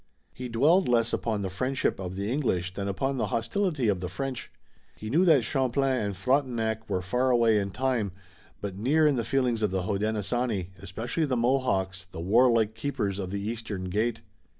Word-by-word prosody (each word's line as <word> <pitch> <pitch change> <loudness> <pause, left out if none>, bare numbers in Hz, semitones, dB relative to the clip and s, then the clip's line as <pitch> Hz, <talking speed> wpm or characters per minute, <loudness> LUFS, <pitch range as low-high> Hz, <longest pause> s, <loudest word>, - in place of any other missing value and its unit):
He 125 -1 -6
dwelled 150 +9 +3
less 115 -1 +2
upon 110 -3 -1
the 95 - -2
friendship 130 +6 -1
of 95 -1 -5
the 100 +1 -3
English 95 - 0
than 100 0 -4
upon 135 +8 -1
the - - 0
hostility 140 - 0
of 100 -3 +1
the 90 0 -4
French. 135 +4 -5 0.4
He 110 +1 -7
knew 165 +7 +4
that 155 -8 +5
Champlain 130 +1 +1
and 100 -2 -2
Frontenac 115 -1 0
were 90 - -1
far 125 +8 +1
away 115 -3 +4
in 100 -1 -2
time, 125 -3 -1 0.5
but 100 -2 -4
near 140 +10 +2
in 150 -2 +4
the 120 - 0
feelings 125 -4 0
of 105 - +2
the 95 0 -1
Hodenosaunee, 105 0 -1
especially 110 - -2
the 130 -2 0
Mohawks, 115 -7 0
the 90 -3 -10
warlike 110 +3 +3
Keepers 105 -5 -2
of 95 -2 -3
the 100 +1 -3
Eastern 105 -4 -4
Gate. 115 +3 0
115 Hz, 185 wpm, -27 LUFS, 100-130 Hz, 0.5 s, that